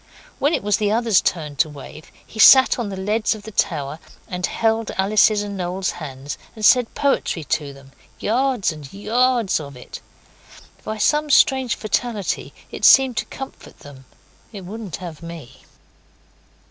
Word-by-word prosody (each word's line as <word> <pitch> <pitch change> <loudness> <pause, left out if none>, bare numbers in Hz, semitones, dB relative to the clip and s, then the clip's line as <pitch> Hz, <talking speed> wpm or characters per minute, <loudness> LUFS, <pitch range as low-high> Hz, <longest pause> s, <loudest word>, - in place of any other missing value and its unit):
When 285 +4 +2
it - - -4
was 205 -1 +1
the 210 -1 0
others' 225 -3 +3
turn 150 -4 -3
to 155 - +2
wave, 150 +1 -12
he 220 - -12
sat 260 +2 +7
on 225 -4 -3
the 195 - -6
leads 215 +4 0
of 210 - -12
the 220 - -9
tower 145 -5 -2 0.3
and 180 0 -6
held 225 -1 0
Alice's 205 +2 +3
and 205 -1 -6
Noel's 185 0 -2
hands, 140 -3 -8 0.2
and 215 -1 -2
said 250 0 +4
poetry 275 - 0
to 145 0 -2
them 135 0 -16 0.3
yards 245 -3 0
and 150 -4 -11
yards 230 0 +1
of 140 -3 -9
it. 125 - -10 0.8
By 215 - -5
some 300 +7 +1
strange 265 -3 +3
fatality 215 -2 -2 0.2
it - - -8
seemed 265 -2 +6
to - - -1
comfort 270 - -10
them. 135 -2 -14 0.5
It 200 -4 -9
wouldn't 205 -3 -7
have 170 -4 -9
me. 165 -6 -11
205 Hz, 160 wpm, -21 LUFS, 160-230 Hz, 0.8 s, sat